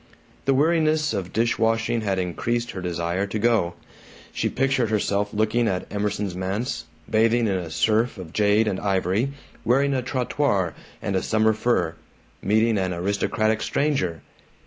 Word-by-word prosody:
The 135 - +3
weariness 155 0 +2
of 95 -4 -3
dish 115 +1 +1
washing 115 +1 +1
had 100 -3 -1
increased 120 +7 -1
her 95 - -6
desire 85 +2 -1
to 105 - -3
go. 105 -6 +2 0.6
She - - 0
pictured 135 -3 +1
herself 105 -1 0
looking 110 +2 +1
at 90 -3 -1
Emerson's 105 -2 -2
manse, 100 +6 -3 0.2
bathing 115 +2 +3
in 100 - +1
a 90 -3 -3
surf 110 +8 +1
of 90 -4 -9
jade 105 +1 +3
and 95 -3 -1
ivory, 100 +6 0 0.3
wearing 140 +4 +3
a 130 - 0
trottoir 125 - 0 0.3
and 100 - -1
a 95 - +2
summer 110 0 +2
fur, 110 -7 +1 0.5
meeting 110 +1 +2
an 95 -1 -1
aristocratic 100 +4 0
Stranger. 95 - 0
110 Hz, 150 wpm, -24 LUFS, 95-120 Hz, 0.6 s, The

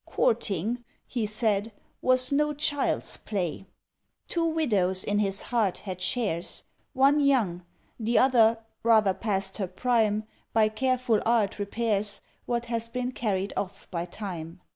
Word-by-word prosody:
"Courting," 235 - 0 0.2
he 235 -4 -2
said, 215 0 0 0.3
"was 255 +1 +4
no 300 +1 +2
child's 290 -1 0
play." 190 -2 -3 0.6
Two 335 -1 0
widows 205 - +1
in 205 0 0
his 195 -1 0
heart 215 -6 +2
had 185 -2 -6
shares 180 -4 -1 0.3
One 275 +2 +4
young; 240 -12 +2 0.4
the 230 +1 +1
other, 230 -3 +5 0.2
rather 220 -4 +4
past 195 -2 -2
her 190 - -1
prime, 215 +1 +1 0.3
By 220 -1 +4
careful 250 -1 +1
art 220 -4 +1
repairs 205 -1 -1 0.3
What 240 0 -1
has 230 -1 -3
been 250 +1 -2
carried 200 -5 -1
off 195 0 -4
by 170 -2 -2
Time. 175 -3 -7
220 Hz, 135 wpm, -27 LUFS, 195-245 Hz, 0.6 s, other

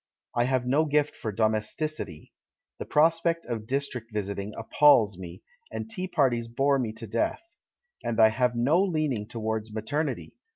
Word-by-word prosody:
I 120 - +2
have 130 -1 0
no 145 +5 +3
gift 150 0 +1
for 110 - -4
domesticity; 110 - -2 0.5
the - - -5
prospect 165 +2 +2
of 115 -3 -4
district 125 -4 -2
visiting 100 -1 -3
appals 115 -3 +4
me, 85 -2 -9 0.3
and - - -5
tea 190 -5 -4
parties 125 -9 +1
bore 135 +4 +2
me 115 -4 -1
to 115 +1 -6
death. 115 - -2 0.5
And 115 -1 -2
I 110 -1 +8
have 125 +2 +1
no 140 +10 +3
leaning 155 - 0
towards 110 -1 -3
maternity. 145 +9 -3
120 Hz, 155 wpm, -27 LUFS, 110-150 Hz, 0.5 s, I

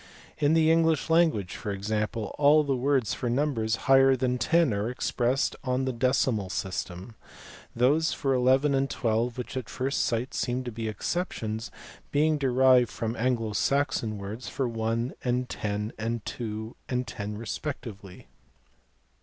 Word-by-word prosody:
In 150 +1 +3
the 160 0 +4
English 165 -1 +2
language 160 - +2
for 105 - -5
example 105 +2 -2
all 150 +1 +6
the 140 -2 0
words 130 -2 +1
for 125 - -3
numbers 120 -4 0
higher 135 0 +6
than 125 -1 0
ten 160 +1 +3
are 100 +3 -1
expressed 125 +1 0
on 130 0 0
the 130 - -1
decimal 120 -4 +1
system: 95 +1 -4 0.6
those 145 +7 +3
for 135 -1 0
11 130 +3 +3
and 135 0 +1
12, 115 +1 -1
which 125 - -6
at 130 -4 -4
first 135 +2 -1
sight 120 +3 -1
seem 125 +1 -1
to 120 - -5
be 115 0 -4
exceptions, 110 - -3 0.4
being 150 +1 +2
derived 130 -2 +4
from 115 0 -3
Anglo 115 -3 0
Saxon 130 -4 0
words 100 +5 -6
for 135 - -1
one 115 +1 -2
and 125 0 0
ten 105 +1 -3
and 115 0 -3
two 110 0 -5
and 125 0 -1
ten 105 -1 -5
respectively. 110 -5 -6
125 Hz, 150 wpm, -27 LUFS, 110-135 Hz, 0.6 s, all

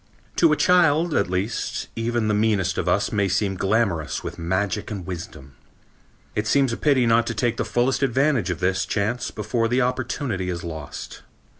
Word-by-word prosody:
To 165 -2 +5
a - - +4
child, 170 -2 +4
at 100 -8 +1
least, 95 +4 -2
even 115 -1 -1
the 105 - +2
meanest 105 -3 +1
of - - -1
us - - +1
may 100 -2 +1
seem 95 +1 0
glamourous 95 -5 0
with - - -6
magic 95 +4 -1
and 100 -5 -5
wisdom. 85 -6 -8 0.8
It 105 0 -2
seems 135 -2 +3
a - - -3
pity 140 -5 +3
not 115 0 +3
to 115 - -2
take 115 +1 0
the - - -1
fullest 125 +3 +1
advantage 135 - +2
of 85 -4 -3
this 95 +1 +1
chance 110 +4 -1
before 115 +2 -1
the 125 +2 +2
opportunity 125 -6 -2
is 85 -1 -4
lost. 80 -5 -7
110 Hz, 180 wpm, -23 LUFS, 95-125 Hz, 0.8 s, To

